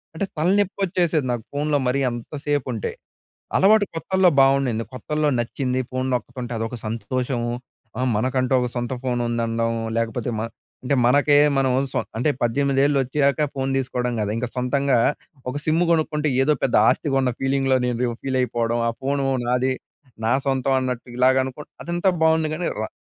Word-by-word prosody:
అంటే 200 - -1
తలనేప్పోచ్చేసేది 180 -4 +1
నాకు 115 -2 -4
ఫోన్‍లో 145 0 +1
మరి 135 +2 +1
అంతసేపు 140 +3 -3
ఉంటే. 110 - -3 0.7
అలవాటు 205 +2 +5
కొత్తల్లో 190 +2 +3
బాగుండింది, 135 -4 +2
కొత్తల్లో 150 +3 -1
నచ్చింది. 125 +2 -1
ఫోన్ 130 0 -2
నొక్కుతుంటే 125 +1 -4
అదొక 115 +3 -3
సంతోషము. 120 +2 -2 0.5
ఆ - - 0
మనకంటూ 130 +3 0
ఒక 125 - 0
సొంత 120 +1 -2
ఫోన్ 125 -1 -1
ఉందనడం 115 0 0 0.3
లేకపోతే 115 +1 -1
మన్ 115 0 -4 0.3
అంటే 135 +2 +1
మనకే 145 +3 +4 0.2
మనోళ్ళు 135 0 +2
సొ 130 - 0 0.2
అంటే 125 +6 +1
18 140 +3 +2
వోచ్చాక 140 +3 +1
ఫోన్ 135 0 -1
తీసుకోవడం 125 -2 -1
కాదు. 105 0 -1
ఇంక 125 +2 -2
సొంతంగా 130 +1 +1 0.5
ఒక - - -4
సిమ్ 160 +2 +2
కొనుక్కుంటే 155 -2 +1
ఏదో 150 +3 +3
పెద్ద 130 - +2
ఆస్తి 150 - +2
కొన్న 130 -2 +2
ఫీలింగ్‌లో 135 -1 +2
నేను 125 -1 -1
ఫీల్ 130 -1 -1
అయిపోవడం, 120 -1 0
ఆ - - +2
ఫోన్ 140 +1 0 0.3
నాది, 125 +1 +1 0.5
నా 115 - +3
సొంతం 135 0 +1
అన్నట్టు 125 -1 -4
ఇలాగ 130 +1 +4
అనుకో 130 +3 -7 0.2
అదంతా 175 +3 +1
బాగుంది 160 -1 +3
కానీ 175 +2 -2
రా 110 - -3
130 Hz, 155 wpm, -23 LUFS, 125-145 Hz, 0.7 s, అలవాటు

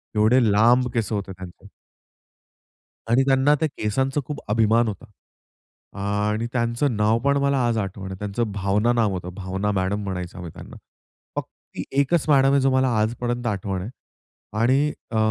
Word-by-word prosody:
एवढे 110 +5 +4
लांब 120 +4 +4
केस 115 -3 -1
होते 100 -2 -3
त्यांचे. 95 -1 -11 1.4
आणि 130 +3 +5
त्यांना 135 +2 +4
त्या 160 - +2
केसांचा 135 +7 0
खूप 150 -1 -5
अभिमान 115 +1 +3
होता. 105 +3 -6 0.9
आणि 105 +3 -1
त्यांचं 120 +1 0
नाव 105 +2 +2
पण 140 0 +3
मला 140 -1 +2
आज 115 -1 +1
आठवण 95 -1 -4
आहे, 95 - -7
त्यांचं 105 +2 -2
भावना 100 +4 +1
नाव 115 -4 +2
होतं, 90 -1 -5
भावना 95 +2 -3
मॅडम 95 +2 -1
म्हणायचो 90 -1 -5
आम्ही 85 -2 -7
त्यांना. - - -11 0.6
फक्त - - -8
एकच 140 +4 +1
मॅडम 135 -2 +5
आहे, 140 - +4
जो 135 0 +3
मला 130 0 +2
आजपर्यंत 120 +2 -2
आठवण 100 -3 -2
आहे 105 - -6 0.7
आणि 135 +5 +3 0.2
अ, 110 - -3
110 Hz, 155 wpm, -23 LUFS, 100-130 Hz, 1.4 s, आणि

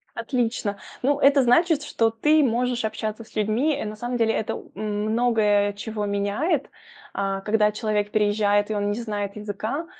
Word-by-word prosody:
Отлично! 230 -3 -1 0.3
Ну, 285 +2 +2
это 280 0 +5
значит, 305 +5 +3
что 225 -6 +1
ты 300 +7 +3
можешь 245 -1 0
общаться 215 +1 -3
с - - -22
людьми. 220 +9 +1
Э, 280 - -4
на 215 0 -6
самом 240 +3 -3
деле 225 -1 +2
это 220 - -2
у - - -12
м, 210 +1 -2
многое 215 -4 +2
чего 210 0 -4
меняет. 205 - -1 0.4
А, 195 -1 -1
когда 210 0 +2
человек 210 -1 -1
переезжает, 205 0 +2
и - - 0
он 205 0 0
не 210 - -2
знает 205 -3 -4
языка, 210 +9 -4
220 Hz, 175 wpm, -24 LUFS, 205-245 Hz, 0.4 s, это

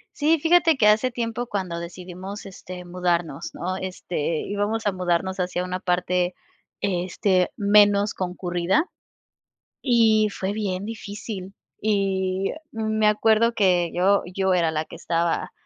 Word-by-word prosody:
Sí, 310 +2 +3
fíjate 330 +1 +4
que 220 -5 +3
hace 220 +4 +3
tiempo 240 0 -3
cuando 185 -6 -3
decidimos, 185 +3 -8
este, 185 -1 -9
mudarnos, 175 -4 -2
¿no?, 185 +2 -3
este, 175 -4 -3
íbamos 205 +2 -2
a 205 - +3
mudarnos 185 0 -1
hacia 180 -1 -1
una 185 0 -3
parte, 180 0 0 0.5
este, 185 0 +1
menos 205 0 +4
concurrida 180 - 0 1.0
y 225 -4 +4
fue 195 0 -3
bien 200 -3 -2
difícil. 205 -3 -7 0.3
Y, 195 -2 0
eh, - - -7 0.2
mm, 220 -1 -2
me 215 - +4
acuerdo 220 +2 +4
que 180 -5 +2
yo 195 +3 +3
yo 190 -1 +2
era 170 -3 +2
la 155 0 -1
que - - -10
estaba 170 0 -1
190 Hz, 140 wpm, -24 LUFS, 180-215 Hz, 1.0 s, fíjate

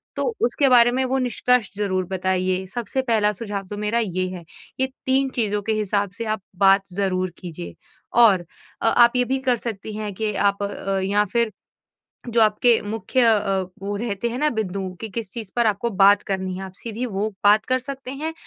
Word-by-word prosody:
तो - - -1 0.2
उसके 260 +4 +2
बारे 240 -1 +6
में 260 +2 0
वो 260 +1 0
निष्कर्ष 250 -3 +1
ज़रूर 190 -3 0
बताइए, 185 0 -1
सबसे 240 +5 -3
पहला 220 -5 +2
सुझाव 200 -2 -5
तो 205 - -5
मेरा 210 +3 0
ये 185 -2 -2
है। 180 -2 -8 0.4
ये 265 - +2 0.2
3 265 +1 +2
चीज़ों 210 -3 0
के 220 +2 -1
हिसाब 205 -1 0
से 230 - -4
आप 215 - -16 0.2
बात 195 0 +6
ज़रूर 185 -1 -1
कीजिए। 155 - -8 0.5
और 190 -6 +5 0.4
अ, - - +1
आप 235 +1 +5
ये 250 0 +2
भी 265 +2 0
कर 245 - +3
सकती 220 -2 -6
हैं 210 -2 -4
कि 215 +2 -2
आप 200 0 +1
अ, 195 -1 -2
या 205 +2 +2
फिर 235 -2 +2 0.8
जो 230 0 +2
आपके 220 +2 +4
मुख्य 225 +5 -1
अ, 205 -4 +3 0.2
वो 200 +1 -3
रहते 225 +1 -2
हैं 240 - -4
ना, 300 +1 +2
बिंदु 200 -5 -3 0.2
कि 225 - -4
किस 220 0 -5
चीज़ 220 -5 -6
पर 240 -1 +2
आपको 215 +3 0
बात 200 0 +5
करनी 190 -1 -2
है 190 - -6
आप 190 - -8
सीधी 230 +3 -5
वो 210 -2 -2
बात 205 +1 +5
कर 255 0 +1
सकते 270 0 -7
हैं 310 +4 -4
210 Hz, 200 wpm, -22 LUFS, 195-235 Hz, 0.8 s, बारे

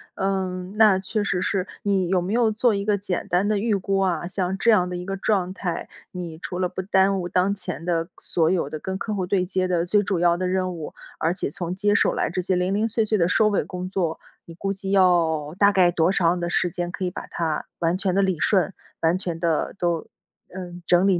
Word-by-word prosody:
嗯， 190 -1 -2
那 215 -3 +6
确 205 +2 -2
实 180 -3 -1
是， 195 -1 -1 0.2
你 195 -3 +1
有 180 0 +2
没 180 +3 -3
有 230 -2 +3
做 225 +2 +2
一 200 0 -2
个 210 -1 +2
简 190 -3 -3
单 180 +3 +1
的 210 0 +1
预 215 +1 +1
估 195 0 0
啊？ 175 -3 0
像 185 0 -2
这 230 +4 +4
样 180 -4 +3
的 180 - -4
一 180 0 -5
个 195 +1 -3
状 190 -2 0
态， 180 -3 -4 0.2
你 175 -3 -6
除 180 +1 -5
了 180 -1 +1
不 185 - -4
耽 190 0 +2
误 175 - -3
当 185 +2 +1
前 190 -4 -6
的， 165 -1 0
所 165 -2 +1
有 170 -6 0
的 155 - -5
跟 190 +4 -4
客 215 +2 -3
户 190 -3 -1
对 185 0 +1
接 185 0 0
的 175 -2 +1
最 205 +3 +3
主 195 -3 -1
要 170 0 +3
的 185 +1 -1
任 185 0 0
务， 160 -3 -7 0.3
而 165 +2 +1
且 185 - -3
从 175 +4 -4
接 205 +2 +2
手 - - +3
来 - - 0
这 185 +2 -2
些 185 +1 0
零 180 +2 0
零 215 +2 +1
碎 225 0 +1
碎 215 0 +1
的 170 -3 +3
收 210 +4 +3
尾 205 - +1
工 180 0 -6
作。 175 -4 -1 0.3
你 165 - -11
估 195 +3 -2
计 195 0 -6
要 170 -5 +3
大 200 0 +6
概 185 -3 +4
多 170 +1 +2
长 175 -2 +2
的 175 0 -2
时 175 - +1
间 175 +1 -3
可 190 +1 -3
以 180 - -2
把 - - -7
它， 160 -3 -2
完 170 0 +1
全 190 -1 0
地 200 - +4
理 190 -3 +1
顺， 195 -1 +2 0.3
完 165 +2 +3
全 175 -3 -4
地 165 -2 0
都 170 -3 -1 0.5
呃， 180 -2 -7
整 180 +2 +4
理 185 -3 +3
185 Hz, 265 characters per minute, -24 LUFS, 175-195 Hz, 0.5 s, 那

